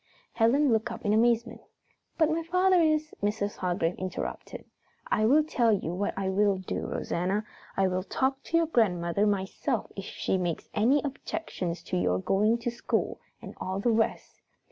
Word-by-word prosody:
Helen 250 Hz, +4 st, +3 dB
looked 225 Hz, +2 st, 0 dB
up -, -, -8 dB
in 205 Hz, -, +3 dB
amazement. 235 Hz, +1 st, +2 dB, 0.6 s
"But 315 Hz, -1 st, +3 dB
my 325 Hz, +1 st, 0 dB
father 365 Hz, +2 st, +3 dB
is 310 Hz, -1 st, +1 dB
" -, -, -37 dB
Mrs. 205 Hz, 0 st, -1 dB
Hargrave 175 Hz, -2 st, 0 dB
interrupted. 185 Hz, 0 st, -5 dB, 0.4 s
"I 215 Hz, 0 st, +2 dB
will 300 Hz, +6 st, +5 dB
tell 240 Hz, -7 st, +2 dB
you 190 Hz, -5 st, -1 dB
what 200 Hz, +3 st, -2 dB
I 195 Hz, -1 st, -1 dB
will 195 Hz, +1 st, +2 dB
do, 185 Hz, -, -4 dB
Rosanna, 190 Hz, +5 st, -1 dB, 0.3 s
I 195 Hz, -1 st, +3 dB
will 185 Hz, 0 st, -1 dB
talk 265 Hz, +7 st, -1 dB
to 330 Hz, -, +1 dB
your 335 Hz, -, +3 dB
grandmother 200 Hz, -, +1 dB
myself 195 Hz, -2 st, -1 dB
if -, -, -6 dB
she 190 Hz, -, -1 dB
makes 175 Hz, -3 st, -3 dB
any 245 Hz, +7 st, +3 dB
objections 275 Hz, -, -4 dB
to -, -, -2 dB
your 90 Hz, 0 st, +1 dB
going 205 Hz, -, +2 dB
to 240 Hz, -, -1 dB
school 240 Hz, -, -2 dB, 0.2 s
and -, -, -8 dB
all 190 Hz, +1 st, -2 dB
the 235 Hz, +4 st, +2 dB
rest." 225 Hz, 0 st, -1 dB
215 Hz, 175 wpm, -28 LUFS, 190-270 Hz, 0.6 s, will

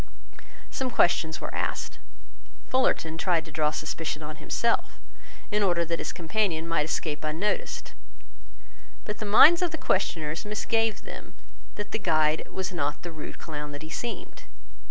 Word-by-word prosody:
Some 260 Hz, -1 st, -1 dB
questions 165 Hz, -7 st, +3 dB
were -, -, -5 dB
asked. -, -, -2 dB, 0.7 s
Fullarton 165 Hz, -11 st, +1 dB
tried 170 Hz, -3 st, +2 dB
to 165 Hz, -, -10 dB
draw 150 Hz, 0 st, +2 dB
suspicion 155 Hz, 0 st, -3 dB
on 155 Hz, +1 st, -6 dB
himself, 230 Hz, +9 st, 0 dB, 0.5 s
in 210 Hz, 0 st, +2 dB
order 175 Hz, -4 st, +3 dB
that 170 Hz, 0 st, -1 dB
his -, -, -2 dB
companion 170 Hz, -2 st, 0 dB
might 165 Hz, -3 st, +2 dB
escape 150 Hz, -1 st, -2 dB
unnoticed. 160 Hz, +7 st, -1 dB, 1.1 s
But 210 Hz, -1 st, -4 dB
the 215 Hz, -, -3 dB
minds 310 Hz, -, +8 dB
of 355 Hz, -, +2 dB
the 320 Hz, -, -4 dB
questioners 160 Hz, -, 0 dB
misgave 220 Hz, +1 st, 0 dB
them -, -, -9 dB, 0.4 s
that 205 Hz, -, -5 dB
the 220 Hz, -, -1 dB
guide 155 Hz, -4 st, +2 dB
was 190 Hz, -1 st, -3 dB
not 145 Hz, -2 st, -1 dB
the 175 Hz, -, -5 dB
rude 155 Hz, -2 st, -7 dB
clown 150 Hz, -2 st, -6 dB
that 145 Hz, +1 st, -7 dB
he 155 Hz, -, -8 dB
seemed. 235 Hz, +5 st, -5 dB
165 Hz, 155 wpm, -28 LUFS, 155-210 Hz, 1.1 s, minds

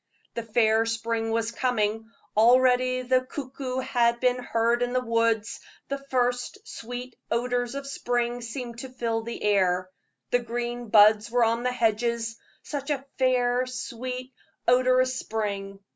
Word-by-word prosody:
The 235 Hz, -, -3 dB
fair 225 Hz, 0 st, +2 dB
spring 225 Hz, 0 st, -1 dB
was 225 Hz, 0 st, 0 dB
coming; 225 Hz, -3 st, -1 dB, 0.3 s
already 255 Hz, +2 st, +4 dB
the 255 Hz, 0 st, +3 dB
cuckoo 260 Hz, -1 st, -5 dB
had 235 Hz, -2 st, +2 dB
been 250 Hz, 0 st, +2 dB
heard 235 Hz, 0 st, +1 dB
in 245 Hz, 0 st, 0 dB
the 255 Hz, -, +3 dB
woods; 230 Hz, -2 st, 0 dB, 0.3 s
the 275 Hz, 0 st, -2 dB
first 250 Hz, +2 st, -1 dB
sweet 245 Hz, +1 st, -7 dB
odors 245 Hz, +1 st, -1 dB
of 280 Hz, 0 st, -5 dB
spring 245 Hz, -3 st, -1 dB
seemed 235 Hz, 0 st, -6 dB
to 265 Hz, -, -7 dB
fill 230 Hz, -3 st, -2 dB
the 235 Hz, +1 st, -6 dB
air; 185 Hz, -3 st, +2 dB, 0.4 s
the 245 Hz, -, +4 dB
green 240 Hz, 0 st, -4 dB
buds 210 Hz, +1 st, +6 dB
were 240 Hz, 0 st, +3 dB
on 230 Hz, +1 st, +2 dB
the 250 Hz, +1 st, 0 dB
hedges 230 Hz, 0 st, 0 dB, 0.3 s
such 285 Hz, -1 st, -5 dB
a 275 Hz, -2 st, -1 dB
fair, 250 Hz, -1 st, +2 dB
sweet, 255 Hz, +1 st, -5 dB, 0.3 s
odorous 255 Hz, +1 st, +3 dB
spring. 200 Hz, -3 st, -4 dB
240 Hz, 145 wpm, -26 LUFS, 225-255 Hz, 0.4 s, buds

